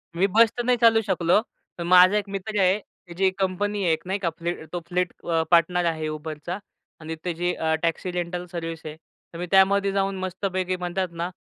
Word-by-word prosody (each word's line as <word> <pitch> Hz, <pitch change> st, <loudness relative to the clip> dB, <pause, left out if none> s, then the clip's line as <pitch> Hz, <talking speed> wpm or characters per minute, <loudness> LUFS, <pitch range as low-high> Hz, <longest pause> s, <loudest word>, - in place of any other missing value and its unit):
मी 190 Hz, +3 st, +3 dB
बस 225 Hz, +2 st, +5 dB
तर 240 Hz, -, -1 dB
नाही 250 Hz, 0 st, +2 dB
चालू 225 Hz, -1 st, +5 dB
शकलो. 185 Hz, -2 st, +2 dB, 0.4 s
पण 170 Hz, -, -4 dB
माझा 185 Hz, +3 st, +7 dB
एक 205 Hz, -1 st, -3 dB
मित्र 200 Hz, +2 st, -3 dB
आहे, 190 Hz, +3 st, +3 dB
त्याची 180 Hz, -1 st, -5 dB
एक 190 Hz, +1 st, 0 dB
कंपनी 200 Hz, +2 st, -1 dB
आहे, 170 Hz, -3 st, +3 dB
एक -, -, -2 dB
नाही 195 Hz, +2 st, -1 dB
का 175 Hz, -3 st, 0 dB
फ्लीट 170 Hz, -1 st, -4 dB
तो 175 Hz, -, -1 dB
फ्लीट 180 Hz, 0 st, -1 dB
अ, 165 Hz, -1 st, +1 dB
पार्टनर 175 Hz, +1 st, +4 dB
आहे 160 Hz, -2 st, -1 dB
Uber 155 Hz, 0 st, -5 dB
चा 180 Hz, +2 st, -3 dB, 0.4 s
आणि 160 Hz, +1 st, -5 dB
त्याची 175 Hz, 0 st, -1 dB
अ, 160 Hz, 0 st, 0 dB
टॅक्सी 170 Hz, +2 st, -1 dB
रेंटल 175 Hz, 0 st, -3 dB
सर्व्हिस 165 Hz, -1 st, -5 dB
आहे, 155 Hz, -, -6 dB, 0.4 s
तर -, -, -7 dB
मी 175 Hz, -, -2 dB
त्यामध्ये 195 Hz, +1 st, +4 dB
जाऊन 195 Hz, 0 st, 0 dB
मस्तपैकी, 185 Hz, 0 st, -2 dB
म्हणतात 180 Hz, +1 st, -2 dB
ना, 175 Hz, -, -1 dB
180 Hz, 210 wpm, -24 LUFS, 170-195 Hz, 0.4 s, माझा